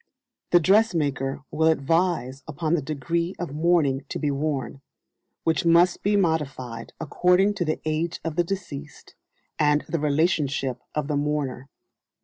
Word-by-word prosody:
The 175 - +6
dressmaker 155 - +1
will 160 +1 +2
advise 160 -3 +1
upon 155 +1 -2
the 170 - +2
"degree" 165 +5 -2
of 175 -6 -5
mourning 150 -4 +2
to - - -3
be 145 -2 0
worn, 140 -1 -3 0.6
which 160 +3 +1
must 170 +1 +4
be 205 +1 +2
modified 140 - -1
according 180 +5 +3
to - - +2
the 155 - -1
age 160 +2 -1
of 165 -2 -3
the 175 - +3
deceased, 155 -6 -7 0.5
and 150 0 +3
the 165 - -1
relationship 145 -4 0
of 150 -2 -1
the 150 -1 0
mourner. 145 -3 -2
155 Hz, 140 wpm, -25 LUFS, 140-170 Hz, 0.6 s, The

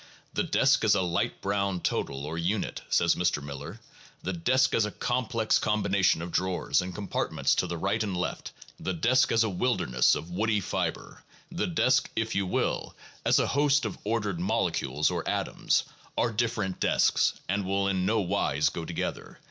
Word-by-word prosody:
"The - - 0
desk - - +3
as - - +4
a 95 - +1
light 85 -1 -1
brown 100 -2 0
total 70 -4 -2
or 80 +2 -4
unit," 90 +5 -2
says 85 -1 +3
Mr. 90 -3 0
Miller, 70 0 -8 0.4
"the 95 - -2
desk 130 +9 +2
as 115 - +3
a 105 - -1
complex 120 -2 0
combination 100 -5 +2
of 85 - -6
drawers 95 +1 +1
and 90 -1 -6
compartments 100 -1 0
to - - +1
the 85 - -4
right 100 +6 0
and 100 -4 -2
left, 90 - -3 0.3
the 95 - -2
desk 125 +9 +3
as 115 0 +4
a 110 - 0
wilderness 90 - +2
of 85 - -6
woody 105 +3 +1
fiber, 95 - -3 0.3
the 175 +4 -1
desk, 135 -7 +2
if 115 0 -1
you 100 -1 0
will, - - -1 0.3
as - - +4
a - - +3
host 140 -2 +2
of 105 - -3
ordered 105 -4 -1
molecules 75 -5 0
or - - -2
atoms, - - 0 0.3
are 120 - +2
different 110 -4 -1
desks, - - +3
and 100 +2 0
will 100 +1 0
in 95 -2 0
no 110 +3 +2
wise 85 -6 +1
go 85 - -6
together - - -4
100 Hz, 180 wpm, -28 LUFS, 90-115 Hz, 0.4 s, as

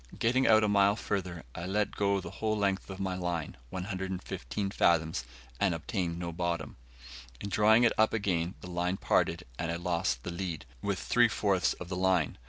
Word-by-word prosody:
Getting 130 +3 +2
out 110 -1 +6
a - - +3
mile 100 0 +4
further, 90 -6 -3
I 85 +2 -5
let 105 +2 0
go 100 -1 +2
the 95 - -7
whole 110 -1 -1
length 100 -2 0
of 95 0 -7
my 95 -1 -1
line, 90 -4 -3
115 95 - -4
fathoms, 80 -9 +2 0.3
and 95 -4 +2
obtained 85 0 -2
no 85 -1 -4
bottom. 85 -1 -2 0.6
In 100 - -5
drawing 110 +4 +5
it 120 - +5
up 110 - +5
again 90 -5 0
the 90 - -8
line 90 +2 0
parted, - - +1 0.2
and 85 - -1
I - - -1
lost 85 -8 -1
the - - -4
lead, 85 -2 -4 0.2
with - - -1
three - - +4
fourths - - +1
of 90 - -9
the 90 - -4
line. 90 -7 +1
95 Hz, 190 wpm, -30 LUFS, 85-100 Hz, 0.6 s, out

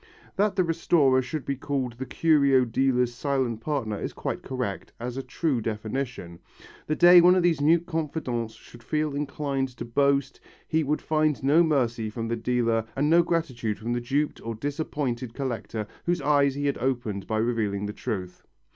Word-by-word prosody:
That 205 0 +1
the 185 - +3
restorer 160 -5 +3
should 130 +3 -5
be 140 - -1
called 135 -2 -2
the 130 - -4
curio 140 -5 +3
dealer's 125 0 +1
silent 130 -3 -1
partner 115 -8 -2
is - - -4
quite - - -4
correct 125 -7 -4
as 120 +1 -4
a 135 - -3
true 135 -3 -1
definition. 110 -4 -4 0.5
The 155 - 0
day 175 +1 +8
one 180 +1 +6
of 185 - +2
these 165 -5 +2
mute 165 +3 +4
confidants 140 -9 -3
should 120 +1 -15
feel 150 +3 -1
inclined 140 -2 -2
to 120 - -5
boast, 140 +2 +1 0.3
he 160 -1 +1
would 150 +2 -1
find 155 -3 +1
no 145 +5 +5
mercy 120 -9 +1
from 115 +1 -4
the 115 - 0
dealer 115 -1 0
and 145 +3 +1
no 170 +1 +7
gratitude 130 -11 -1
from 115 +3 -3
the 120 - -1
duped 140 +5 -1
or 115 0 -4
disappointed 130 -2 -3
collector 120 -5 -3 0.2
whose 175 0 +2
eyes 140 -2 +3
he 145 0 -2
had 140 - 0
opened 120 -6 -2
by 110 - -1
revealing 110 -3 0
the 105 - -4
truth. 95 -7 -5
135 Hz, 180 wpm, -26 LUFS, 115-150 Hz, 0.5 s, day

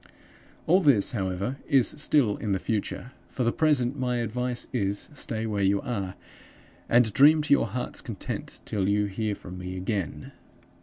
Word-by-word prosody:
"All 180 +4 +5
this, 140 - +4
however, 100 +3 -2
is 135 -4 +4
still 145 -7 +2
in 105 -3 -2
the - - +2
future. 110 +4 -3 0.2
For 130 - -2
the 115 - +2
present 140 -4 +1
my 125 -1 0
advice 120 +2 -2
is, 100 -4 -1
stay 115 -5 -3
where 105 -2 -1
you 100 +1 +3
are, 100 -6 -3 0.7
and 115 -3 +4
dream 150 +5 +6
to 150 - +3
your - - +3
heart's 125 -1 -4
content, - - -6
till 100 -2 0
you 105 0 +2
hear 105 +1 -2
from 90 -1 -9
me 90 +1 -5
again. 95 -2 -3
115 Hz, 165 wpm, -27 LUFS, 100-125 Hz, 0.7 s, dream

